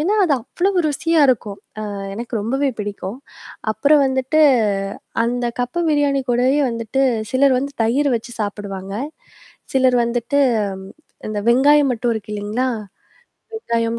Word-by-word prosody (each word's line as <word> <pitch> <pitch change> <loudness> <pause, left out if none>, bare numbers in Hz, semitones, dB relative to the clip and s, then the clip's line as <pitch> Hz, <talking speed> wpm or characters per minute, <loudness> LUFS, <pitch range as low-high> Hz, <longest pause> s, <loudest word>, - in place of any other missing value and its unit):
ஏன்னா 380 +8 +1
அது 315 - +2
அவ்ளோ 360 - -1 0.2
ருசியா 325 +3 0
இருக்கும். 210 -5 0 0.2
ஆ - - -4 0.3
எனக்கு 235 +2 -6
ரொம்பவே 270 +7 0
பிடிக்கும். 205 +1 -5 0.5
அப்புறம் 290 +5 +4
வந்துட்டு, 265 +4 +1 0.8
அந்த 245 +1 -1
கப்பு 245 +8 -1
பிரியாணி 285 -2 +2
கூடவே 250 +3 +2
வந்துட்டு 230 +3 -1 0.3
சிலர் 265 0 +4
வந்து 280 +2 -5
தயிர் 270 +6 +2
வச்சு 235 +1 -6
சாப்பிடுவாங்க. 195 -2 -5 0.8
சிலர் 260 -2 +4
வந்துட்டு 240 +4 0 0.4
ம் 190 - -11 0.4
இந்த 210 -1 -2
வெங்காயம் 280 +2 +5
மட்டும் 235 0 -1
இருக்கு 215 -1 -6
இல்லைங்களா? 210 +5 -1 0.9
வெங்காயம் 230 - -1
245 Hz, 130 wpm, -20 LUFS, 225-280 Hz, 0.9 s, வெங்காயம்